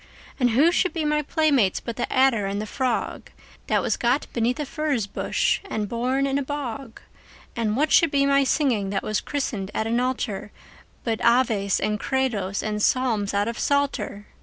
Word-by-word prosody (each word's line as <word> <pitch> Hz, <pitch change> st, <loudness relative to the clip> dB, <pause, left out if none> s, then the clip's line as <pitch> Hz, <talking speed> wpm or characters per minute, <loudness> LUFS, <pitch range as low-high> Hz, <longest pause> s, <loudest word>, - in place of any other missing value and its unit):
And 250 Hz, -2 st, +3 dB
who 280 Hz, +9 st, +4 dB
should 365 Hz, -1 st, +1 dB
be 320 Hz, -3 st, -2 dB
my 300 Hz, 0 st, +1 dB
playmates 290 Hz, -, +2 dB
but 235 Hz, -, -6 dB
the 240 Hz, -, -3 dB
adder 260 Hz, -6 st, +3 dB
and 200 Hz, +1 st, -2 dB
the 215 Hz, -, -3 dB
frog, 250 Hz, +2 st, -2 dB, 0.4 s
That -, -, +1 dB
was -, -, 0 dB
got 245 Hz, +4 st, +1 dB
beneath 240 Hz, +4 st, 0 dB
a 300 Hz, -, -1 dB
furze 280 Hz, -6 st, -1 dB
bush 200 Hz, -, 0 dB
and 220 Hz, -, -3 dB
born 255 Hz, +5 st, 0 dB
in 275 Hz, 0 st, 0 dB
a -, -, -1 dB
bog? 265 Hz, -4 st, -5 dB, 0.5 s
And 220 Hz, -2 st, 0 dB
what 300 Hz, +2 st, +1 dB
should 335 Hz, -, +5 dB
be 275 Hz, -1 st, +2 dB
my 280 Hz, 0 st, +4 dB
singing, 250 Hz, -8 st, +1 dB
that 195 Hz, 0 st, -2 dB
was 215 Hz, -, -1 dB
christened 225 Hz, -9 st, -3 dB
at 220 Hz, -, 0 dB
an 230 Hz, +2 st, +1 dB
altar, 230 Hz, -5 st, -2 dB, 0.5 s
But 225 Hz, -2 st, -2 dB
Aves 230 Hz, -5 st, +3 dB
and 210 Hz, 0 st, -1 dB
Credos 230 Hz, -9 st, -1 dB
and 210 Hz, -1 st, -2 dB
Psalms 220 Hz, -5 st, +1 dB
out 205 Hz, +1 st, +1 dB
of 230 Hz, -, -4 dB
Psalter? 280 Hz, -7 st, -1 dB
245 Hz, 185 wpm, -24 LUFS, 215-275 Hz, 0.5 s, should